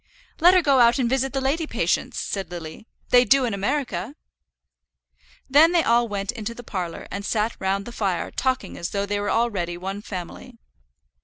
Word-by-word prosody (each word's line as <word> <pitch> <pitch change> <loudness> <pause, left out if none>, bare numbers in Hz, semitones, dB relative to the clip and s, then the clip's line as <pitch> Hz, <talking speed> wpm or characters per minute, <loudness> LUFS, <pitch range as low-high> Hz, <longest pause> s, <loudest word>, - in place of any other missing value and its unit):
"Let 355 +3 +6
her 365 - +4
go 275 -3 +4
out 235 +1 +5
and 255 -3 +1
visit 265 +2 0
the 270 - -1
lady 290 +5 -1
patients," 175 - -1
said 195 -4 -3
Lily. 170 +4 -8 0.2
"They 245 0 +7
do 265 +2 +4
in 230 - -2
America." 205 +1 -2 1.3
Then 310 +5 +6
they 340 -2 +4
all 235 0 +3
went 200 -2 -3
into 225 +1 -6
the 245 - -10
parlour 180 -7 -5
and 200 +1 -4
sat 220 +2 -1
round 195 +1 -1
the 240 - -8
fire 195 -7 -2
talking 260 -1 -2
as 170 - -3
though 200 0 -2
they 205 0 -2
were 205 - -2
already 195 -7 0
one 195 +3 -5
family. 205 +6 -8
225 Hz, 185 wpm, -23 LUFS, 195-260 Hz, 1.3 s, They